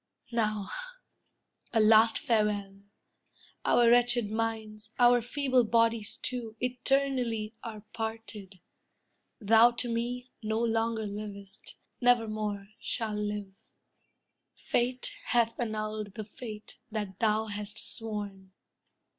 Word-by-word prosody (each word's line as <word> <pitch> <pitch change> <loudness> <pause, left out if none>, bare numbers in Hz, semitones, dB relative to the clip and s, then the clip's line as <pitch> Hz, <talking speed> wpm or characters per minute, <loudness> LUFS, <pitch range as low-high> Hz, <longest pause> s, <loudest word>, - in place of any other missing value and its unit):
Now, 215 -3 0 1.0
a 225 - +2
last 220 +1 +6
farewell! 210 -6 0 0.8
Our 240 -1 +4
wretched 240 -3 +3
minds, 220 -1 -3
our 245 0 +6
feeble 260 +1 +2
bodies, 230 -1 +2
too, 240 -3 -3
Eternally 250 -3 0
are 215 -3 -7
parted. 220 -4 -6 0.8
Thou 225 +2 +6
to 240 +1 -1
me 245 +2 -3
No 220 0 -1
longer 225 -1 0
livest, 200 -1 -8 0.3
nevermore 215 -4 +1
shall 225 -3 -2
live. 210 -2 -3 1.0
Fate 250 +1 -1
hath 230 -1 +1
annulled 215 -3 -3
the 215 - -5
faith 215 -1 -9
that 210 -4 -4
thou 220 0 +2
hast 210 -1 -5
sworn." 205 -4 -4
220 Hz, 100 wpm, -30 LUFS, 210-235 Hz, 1.0 s, last